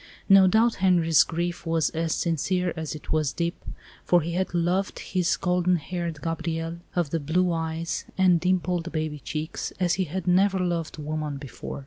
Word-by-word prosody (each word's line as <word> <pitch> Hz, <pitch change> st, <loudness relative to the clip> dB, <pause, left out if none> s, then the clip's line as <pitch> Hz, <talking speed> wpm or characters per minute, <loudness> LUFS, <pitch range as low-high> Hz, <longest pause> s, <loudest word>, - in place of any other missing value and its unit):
No 195 Hz, -1 st, +7 dB
doubt 225 Hz, +5 st, +3 dB
Henri's 170 Hz, -5 st, +4 dB
grief 170 Hz, +3 st, -2 dB
was 165 Hz, -2 st, +1 dB
as 165 Hz, -1 st, -1 dB
sincere 175 Hz, +2 st, 0 dB
as 160 Hz, -2 st, -4 dB
it 155 Hz, -, -9 dB
was 155 Hz, -3 st, +1 dB
deep, 170 Hz, 0 st, -3 dB, 0.4 s
for 175 Hz, -1 st, +4 dB
he 165 Hz, +2 st, -3 dB
had 185 Hz, +2 st, -1 dB
loved 175 Hz, +3 st, 0 dB
his 180 Hz, -2 st, 0 dB
golden 180 Hz, 0 st, +2 dB
haired 170 Hz, -1 st, -4 dB
Gabrielle 165 Hz, 0 st, -3 dB, 0.2 s
of 170 Hz, -5 st, 0 dB
the 165 Hz, -, 0 dB
blue 175 Hz, +5 st, +1 dB
eyes 165 Hz, 0 st, -3 dB
and 185 Hz, -3 st, +4 dB
dimpled 180 Hz, -1 st, 0 dB
baby 155 Hz, -2 st, -3 dB
cheeks 155 Hz, +4 st, -4 dB
as 180 Hz, -2 st, +2 dB
he -, -, +1 dB
had 175 Hz, +3 st, -4 dB
never 190 Hz, +2 st, +3 dB
loved 170 Hz, -3 st, -2 dB
woman 150 Hz, -1 st, -3 dB
before. 140 Hz, 0 st, -7 dB
170 Hz, 170 wpm, -26 LUFS, 160-180 Hz, 0.4 s, No